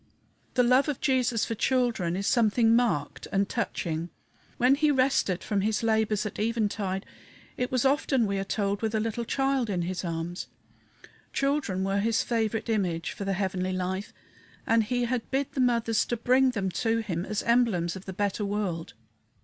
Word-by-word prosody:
The 250 - +4
love 255 +4 +4
of 285 - -2
Jesus 250 -5 +1
for - - -3
children 230 -8 +1
is 195 +1 -2
something 225 0 +3
marked 230 -12 0
and 195 0 +1
touching. 170 -8 -3 0.5
When 250 +2 +5
he 300 +2 +3
rested 260 -9 +2
from 205 -3 0
his 215 +2 0
labors 220 -1 +1
at 210 - -5
eventide, 210 -4 -1 0.5
it 250 - -2
was 255 0 +1
often, 270 -3 +2
we 200 -1 -1
are - - -1
told, 200 0 -1
with 220 0 -1
a - - +2
little 225 +2 -2
child 270 -2 0
in 180 -3 -1
his 180 +1 -3
arms 170 +1 -4 0.9
children 275 -10 0
were 195 +1 0
his 225 +2 +1
favorite 225 -2 -1
image 185 -7 -1
for 200 - -6
the 195 - 0
heavenly 185 -1 -1
life, 185 +2 -3 0.5
and 225 -1 +3
he 245 +2 0
had 240 -1 -2
bid 270 0 -1
the 265 - -1
mothers 230 -3 +2
to 240 - -2
bring 255 +3 +4
them 200 -6 -2
to 225 +3 0
him 175 -5 -3
as 215 +1 -3
emblems 225 -8 +2
of 190 - -9
the 190 - -5
better 205 +2 -1
world. 200 -5 -3
220 Hz, 180 wpm, -27 LUFS, 195-245 Hz, 0.9 s, When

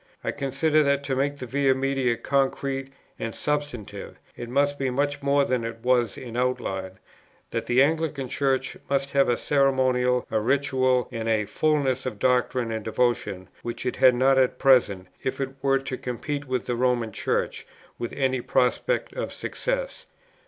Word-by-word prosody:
I - - -1
considered 145 +2 +1
that 140 0 +2
to 135 -2 -1
make 140 +2 0
the 130 - -6
Via 135 +1 +2
Media 135 -3 0
concrete 135 0 -1 0.3
and 115 -1 -4
substantive, 145 -7 -4 0.2
it 120 0 -7
must 145 +2 +1
be 135 -1 0
much 145 +3 -1
more 140 0 +3
than 125 -3 0
it 115 0 -6
was 125 -3 +2
in 120 -2 -8
outline; 95 -7 -1 0.6
that - - -3
the 125 +2 +5
Anglican 155 -3 -1
Church 135 +1 0
must 140 0 0
have 140 -2 +3
a 120 - +2
ceremonial, 130 -3 +2
a 110 - +2
ritual, 130 +1 +2
and 115 0 -3
a 110 -1 +2
fulness 135 +2 0
of 115 -5 -4
doctrine 125 0 +1
and 110 -1 -3
devotion, 110 -5 -1
which 120 +1 -5
it 125 - -2
had 130 -1 +6
not 135 +2 +4
at 130 -1 +2
present, 115 -9 +4 0.2
if 130 - -3
it 135 -1 -1
were 135 -1 +3
to 135 -1 -5
compete 140 +4 -4
with 130 -5 -1
the 120 - -1
Roman 120 -2 +1
Church - - -2 0.3
with 120 - -3
any 130 -2 0
prospect 125 - 0
of - - -4
success. - - -4
130 Hz, 170 wpm, -25 LUFS, 120-140 Hz, 0.6 s, had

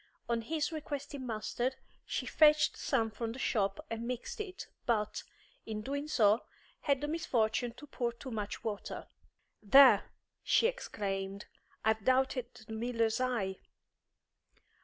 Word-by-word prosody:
On 235 -1 0
his 310 +6 -1
requesting 285 -3 -5
mustard, 240 +3 -1 0.3
she - - -2
fetched 305 -1 +5
some 225 -1 0
from 225 +1 -4
the - - -9
shop 230 +4 0
and 230 -1 -4
mixed 250 - -4
it, 380 -3 -6 0.2
but, 215 -3 +1 0.4
in 215 -1 -4
doing 285 +3 -3
so, 220 -6 +4 0.4
had 280 -2 +1
the 295 - -1
misfortune 245 -7 0
to 275 +5 -12
pour 245 -4 -2
too 250 +3 -9
much 210 -2 -4
water. 210 -3 -4 0.6
"There!" 265 +6 +7 0.3
she - - +3
exclaimed; 200 - -2 0.4
"I've 220 -1 +2
doubted 260 0 +2 0.2
the 220 - -8
miller's 230 0 0
eye." 225 -7 0
240 Hz, 135 wpm, -33 LUFS, 220-280 Hz, 0.6 s, There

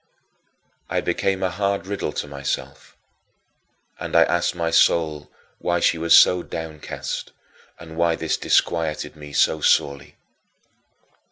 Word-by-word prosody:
I - - 0
became 95 -1 -1
a 95 - 0
hard 100 0 -1
riddle 100 0 -3
to - - -4
myself, 70 -1 -5 1.0
and - - -5
I - - +7
asked 85 0 0
my 85 -1 -1
soul 80 -2 +2 0.3
why 85 0 0
she 85 -1 +2
was 85 0 +5
so 90 -1 +5
downcast 80 -3 -6 0.5
and 80 -1 -11
why 85 0 +2
this - - -1
disquieted 80 -2 0
me 75 -1 -11
so - - +2
sorely. 70 0 +1
85 Hz, 125 wpm, -22 LUFS, 75-85 Hz, 1.0 s, I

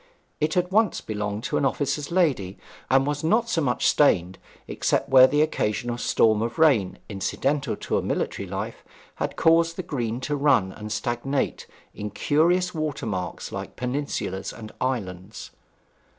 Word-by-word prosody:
It 150 - 0
had 180 0 +1
once 215 -1 +2
belonged 105 0 -4
to - - -1
an - - 0
officer's 140 +1 -1
lady, 140 - +1 0.3
and 135 +1 +4
was 145 +2 -2
not 225 +8 +2
so 165 - +1
much 125 -4 0
stained, 95 - +3 0.3
except - - 0
where 130 -1 +8
the 145 +3 +3
occasional 120 -5 -1
storms 110 -3 +3
of 115 +1 -3
rain, 135 - +3
incidental 135 +6 -1
to - - -1
a - - -2
military - - -2
life, - - -5 0.3
had - - -3
caused 165 0 +3
the 185 - -4
green 120 -7 -3
to 145 +3 -2
run 135 -10 +3
and 105 +2 -8
stagnate 120 +5 -2 0.3
in 105 0 -5
curious 175 - +2
watermarks 115 - -3
like - - -6
peninsulas 125 -7 -3
and 110 -2 -10
islands. 105 -5 -4
130 Hz, 150 wpm, -25 LUFS, 105-155 Hz, 0.3 s, where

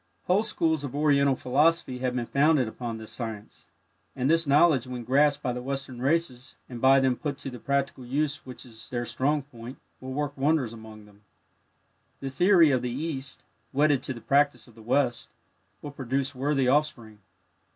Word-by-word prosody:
Whole 185 +3 +2
schools 165 -8 0
of 140 -1 -6
Oriental 140 -2 +3
Philosophy 140 0 +1
have 125 -1 -2
been 120 -2 -1
founded 140 -1 +2
upon 115 0 -5
this 110 -1 -9
science, 105 -9 -7 0.5
and 130 -1 -1
this 165 -1 +2
knowledge 140 -3 +4
when 125 -1 -6
grasped 145 +4 +2
by 125 -3 -1
the 125 - -5
Western 135 -1 -5
races, 135 -3 -1
and 120 -2 -8
by 135 +1 +6
them 130 -1 +2
put 145 +1 -4
to 135 - -7
the 125 - -9
practical 140 0 -2
use 145 +4 -2
which 130 0 -10
is 115 -2 -12
their 120 -1 -3
strong 145 +4 0
point, 125 -2 -11 0.2
will 130 0 -8
work 145 +1 -3
wonders 140 -4 +1
among 110 -2 -12
them. 105 0 -21 1.0
The 135 -1 -5
theory 170 +2 +5
of 130 -2 +1
the 125 - -3
East, 140 +1 -5 0.3
wedded 145 -1 +3
to 130 - -4
the 115 - -10
practice 140 +2 +1
of 120 - -18
the 110 - -15
West, 120 +1 0 0.5
will 145 - -6
produce 135 0 -2
worthy 135 0 0
offspring. 125 -6 0
135 Hz, 185 wpm, -27 LUFS, 125-145 Hz, 1.0 s, by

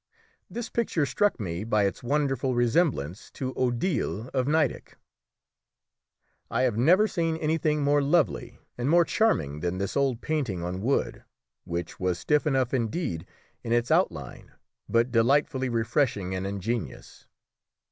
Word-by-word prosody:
This 230 +5 -5
picture 190 -10 0
struck 205 +2 +1
me 90 -2 -3
by 105 -2 +2
its 100 - -1
wonderful 135 -1 0
resemblance 120 - +1
to 130 -1 -4
Odile 120 - -1
of 130 -1 0
Nideck. 155 -3 0 1.5
I 120 +3 0
have 125 -5 +1
never 175 - +4
seen 165 -5 -1
anything 155 -1 0
more 145 +1 +3
lovely 150 +2 +1 0.2
and 125 +3 0
more 170 +1 +5
charming 120 - +1
than 90 +3 -2
this 100 0 -3
old 135 -4 +1
painting 130 - -2
on 90 +2 -4
wood, 130 +6 -1 0.4
which 85 0 -5
was 90 -2 0
stiff 150 - +1
enough 130 -3 +1
indeed 115 - -2 0.4
in 115 - -4
its 120 0 +1
outline, - - -1 0.4
but 115 +2 +2
delightfully 130 +3 +2
refreshing 115 -4 0
and 95 +1 -2
ingenuous. 105 +4 -5
130 Hz, 135 wpm, -27 LUFS, 105-150 Hz, 1.5 s, more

